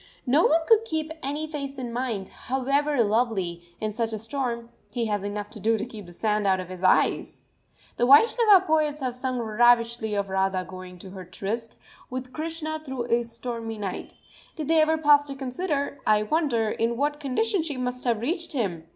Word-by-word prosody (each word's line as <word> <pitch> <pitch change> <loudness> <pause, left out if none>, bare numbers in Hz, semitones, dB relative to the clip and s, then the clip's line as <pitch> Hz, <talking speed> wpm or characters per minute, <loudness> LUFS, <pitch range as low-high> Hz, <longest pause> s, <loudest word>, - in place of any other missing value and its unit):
No 285 +6 +4
one 325 +2 +3
could 450 -1 +6
keep 315 -7 -3
any 295 +2 -2
face 280 -3 -5
in 245 -3 -5
mind, 235 -6 -2
however 275 +1 0
lovely, 205 -6 0 0.2
in 215 0 -2
such 225 +1 -2
a - - -1
storm, 235 0 -3 0.2
he 240 -2 -1
has 205 -2 -1
enough 205 0 -4
to 220 - -9
do 225 +3 +2
to 215 - -3
keep 215 -6 -10
the - - -11
sand 210 +2 0
out 190 -1 +3
of 180 -1 -6
his 185 0 -8
eyes!... 185 - +2 0.5
The 240 - +2
Vaishnava 400 - +6
poets 305 -2 +1
have 255 -2 -1
sung 255 0 -3
ravishingly 230 0 +3
of 200 -1 0
Radha 190 -1 0
going 185 -1 -9
to 185 +1 -11
her 190 -1 -8
tryst 205 +6 -5 0.3
with 255 0 -6
Krishna 315 0 -3
through 265 -4 -4
a 240 - +4
stormy 230 -1 -5
night. 200 -3 -5 0.4
Did 310 -3 -5
they 325 -1 +5
ever 320 +1 +3
pause 290 -2 +5
to 275 - -6
consider, 280 +1 -3
I 210 0 +4
wonder, 235 -4 +1
in 230 +1 -1
what 295 +2 0
condition 345 - 0
she 305 -4 -4
must 250 0 -3
have 230 -3 +1
reached 335 - -1
him? 180 - -2
245 Hz, 195 wpm, -26 LUFS, 215-290 Hz, 0.5 s, could